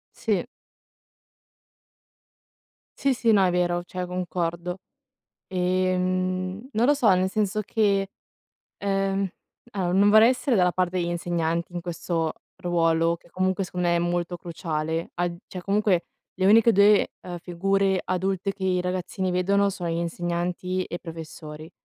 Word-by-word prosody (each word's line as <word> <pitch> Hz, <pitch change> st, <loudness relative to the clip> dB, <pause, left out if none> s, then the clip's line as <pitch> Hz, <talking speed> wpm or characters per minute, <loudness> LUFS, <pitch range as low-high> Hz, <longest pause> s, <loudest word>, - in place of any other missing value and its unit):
Sì. -, -, 0 dB, 2.6 s
Sì, 275 Hz, -1 st, +3 dB
sì 235 Hz, -2 st, +2 dB
no, 200 Hz, -3 st, +5 dB
è -, -, +3 dB
vero 175 Hz, 0 st, +1 dB
cioè, 180 Hz, 0 st, -4 dB
concordo. 180 Hz, 0 st, -3 dB, 0.7 s
E, 185 Hz, 0 st, +1 dB
mhmm, 185 Hz, +4 st, -2 dB
non 225 Hz, +3 st, +3 dB
lo 290 Hz, -, +5 dB
so, 235 Hz, -9 st, +4 dB
nel 185 Hz, +1 st, +2 dB
senso 215 Hz, +1 st, 0 dB
che, 200 Hz, -2 st, +1 dB, 0.7 s
ehm 195 Hz, 0 st, 0 dB, 0.4 s
allora 185 Hz, -4 st, -1 dB
non 200 Hz, +2 st, +5 dB
vorrei 220 Hz, +3 st, +7 dB
essere 255 Hz, -1 st, +1 dB
dalla 180 Hz, -2 st, +3 dB
parte 185 Hz, 0 st, 0 dB
degli 175 Hz, -, 0 dB
insegnanti 170 Hz, 0 st, -1 dB
in 175 Hz, -, -4 dB
questo 165 Hz, -1 st, -2 dB, 0.2 s
ruolo, 170 Hz, -2 st, +1 dB
che 170 Hz, -, -24 dB
comunque, 185 Hz, +1 st, 0 dB
secondo 180 Hz, -1 st, -2 dB
me, 170 Hz, -, +3 dB
è -, -, +3 dB
molto 175 Hz, 0 st, -1 dB
cruciale; 160 Hz, -1 st, -3 dB
a 175 Hz, 0 st, -1 dB
cioè, 180 Hz, -1 st, -8 dB
comunque 200 Hz, -2 st, +1 dB, 0.3 s
le 190 Hz, 0 st, +1 dB
uniche 225 Hz, +3 st, +6 dB
2 200 Hz, +1 st, +5 dB, 0.3 s
figure 190 Hz, +2 st, +1 dB
adulte 190 Hz, +2 st, -1 dB
che 195 Hz, -1 st, -6 dB
i 185 Hz, -1 st, +2 dB
ragazzini 185 Hz, +1 st, -2 dB
vedono 200 Hz, +3 st, +2 dB
sono 180 Hz, -3 st, -4 dB
gli 165 Hz, -, -1 dB
insegnanti 175 Hz, +2 st, -2 dB
e 175 Hz, -, -5 dB
i -, -, -11 dB
professori. 160 Hz, -1 st, -9 dB
185 Hz, 145 wpm, -25 LUFS, 175-195 Hz, 2.6 s, vorrei